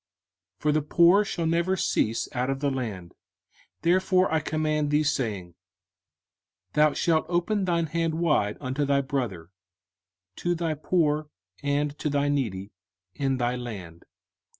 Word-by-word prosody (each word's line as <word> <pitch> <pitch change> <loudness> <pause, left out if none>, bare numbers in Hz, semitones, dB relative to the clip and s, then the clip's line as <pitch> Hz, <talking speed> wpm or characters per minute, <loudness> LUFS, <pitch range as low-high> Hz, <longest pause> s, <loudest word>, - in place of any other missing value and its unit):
05:015:011 - - -39
For 150 - +3
the 155 +1 +2
poor 170 +6 +5
shall 180 -5 -3
never 170 +3 +1
cease 115 -8 0
out 125 +1 -1
of 135 0 -1
the 140 0 0
land: 105 -10 -5 0.7
therefore 185 +1 +3
I 160 - +3
command 155 -1 -1
thee, 150 +1 +3
saying, 105 - -2 1.2
Thou 150 -1 +4
shalt 160 -2 +1
open 185 +3 0
thine 170 -2 +1
hand 165 0 -1
wide 150 -11 +1
unto 135 +1 -2
thy 140 0 +2
brother, 120 - -3 0.9
to 175 0 0
thy 165 -1 -1
poor, 155 -1 0 0.3
and 145 0 0
to 150 - -1
thy 145 0 +1
needy, 105 -9 -2 0.4
in 135 -2 -1
thy 120 0 0
land. 100 -9 -8
150 Hz, 145 wpm, -26 LUFS, 125-165 Hz, 1.2 s, poor